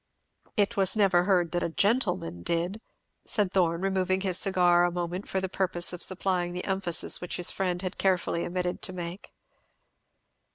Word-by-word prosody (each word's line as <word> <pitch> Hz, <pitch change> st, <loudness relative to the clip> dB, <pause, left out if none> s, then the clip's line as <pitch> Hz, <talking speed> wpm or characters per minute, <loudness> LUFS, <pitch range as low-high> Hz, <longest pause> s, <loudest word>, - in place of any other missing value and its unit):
"It 205 Hz, +2 st, +2 dB, 0.2 s
never 195 Hz, -4 st, +4 dB
was 180 Hz, -, 0 dB
heard 175 Hz, -4 st, +2 dB
that 175 Hz, -, -1 dB
a -, -, -1 dB
gentleman 180 Hz, -, 0 dB
did," 175 Hz, -, -1 dB, 0.4 s
said 205 Hz, -4 st, 0 dB
Thorn, 170 Hz, -2 st, +1 dB
removing 190 Hz, -1 st, 0 dB
his 185 Hz, -2 st, 0 dB
cigar 180 Hz, -2 st, +3 dB
a 175 Hz, -, +3 dB
moment 175 Hz, +2 st, -4 dB
for 190 Hz, -, 0 dB
the 190 Hz, -, -2 dB
purpose 180 Hz, -2 st, 0 dB
of 180 Hz, -, -7 dB
supplying 185 Hz, -2 st, -1 dB
the 180 Hz, -, -4 dB
emphasis 190 Hz, -4 st, +1 dB
which 180 Hz, -, -3 dB
his 180 Hz, -, 0 dB
friend 180 Hz, -1 st, -2 dB
had 185 Hz, -, -5 dB
carefully 180 Hz, -3 st, +1 dB
omitted 180 Hz, 0 st, -3 dB
to 185 Hz, -, 0 dB
make. 175 Hz, +1 st, -7 dB
180 Hz, 170 wpm, -27 LUFS, 175-190 Hz, 0.4 s, never